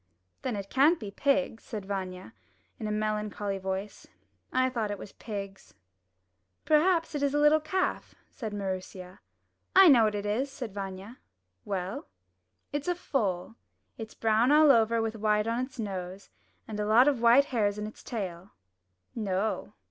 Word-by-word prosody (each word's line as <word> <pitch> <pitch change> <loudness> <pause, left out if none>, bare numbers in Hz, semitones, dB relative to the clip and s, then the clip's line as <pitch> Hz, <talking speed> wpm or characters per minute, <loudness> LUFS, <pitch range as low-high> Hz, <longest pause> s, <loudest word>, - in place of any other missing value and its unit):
'Then 250 -4 -2
it 200 -1 -5
can't 300 +6 +4
be 210 -3 -7
pigs," 270 -1 0
said 210 -3 -6
Vanya, 190 0 -5 0.5
in 220 - -3
a - - -2
melancholy 210 -2 -2
voice. 190 +2 -5 0.4
''I 255 0 +2
thought 230 -5 -2
it 205 - -3
was 195 - -10
pigs." 200 -3 -8 0.9
'Terhaps 330 +2 +3
it 290 - -2
is 285 0 +1
a - - +3
little 295 +1 +5
calf," 370 +5 -2
said 225 -6 -7
Maroosia. 185 -2 -5 0.6
'1 380 -4 +9
know 235 -5 +6
what 210 -1 0
it 205 0 -3
is," 245 +7 -1
said 245 -6 -7
Vanya. 195 +3 -7 0.5
'Well?" 190 -1 -4 0.7
"It's 290 +2 -3
a 355 - +1
foal. 210 - -2 0.4
It's 220 -1 -8
brown 225 +3 +2
all 300 -1 +7
over 230 -2 +3
with 225 0 -3
white 210 0 +1
on 230 +2 0
its 260 - -19
nose, 190 -3 -6 0.4
and 215 -2 -5
a 210 - -1
lot 235 +5 +6
of 275 -5 +2
white 240 +4 +6
hairs 205 -3 +1
in 210 - -3
its 215 - -10
tail." 190 -5 -6 0.6
"No." 210 -1 -2
215 Hz, 165 wpm, -29 LUFS, 200-260 Hz, 0.9 s, 1